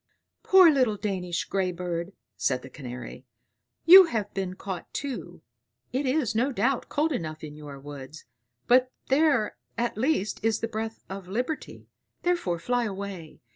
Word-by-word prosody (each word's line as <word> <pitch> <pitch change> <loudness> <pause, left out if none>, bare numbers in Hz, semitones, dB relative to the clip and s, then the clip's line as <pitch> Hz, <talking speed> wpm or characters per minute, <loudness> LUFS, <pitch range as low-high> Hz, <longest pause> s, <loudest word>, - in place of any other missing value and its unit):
"Poor 375 -3 +7
little 255 -7 +2
Danish 185 -4 -2
grey 190 -2 0
bird," 175 +1 -4 0.2
said 130 -1 0
the 135 - -11
Canary; 125 -2 -8 0.6
"you 370 +3 +11
have 220 -9 -3
been 190 -1 -3
caught 190 -2 -6
too. 180 - -5 0.5
It 265 +2 0
is, 255 -5 +1
no 245 +6 +1
doubt, 265 0 0
cold 310 +2 +1
enough 155 - -4
in 150 -1 -7
your 145 -2 -9
woods, 145 +1 -10 0.4
but 255 +1 +4 0.2
there 270 -5 +3 0.2
at 235 -2 -1
least 245 -6 0
is 225 -1 +2
the 230 - -2
breath 225 0 -5
of 195 -1 -7
liberty; 250 - -4 0.4
therefore 345 - +1
fly 245 +7 0
away. 195 -6 -6
205 Hz, 150 wpm, -27 LUFS, 170-255 Hz, 0.6 s, you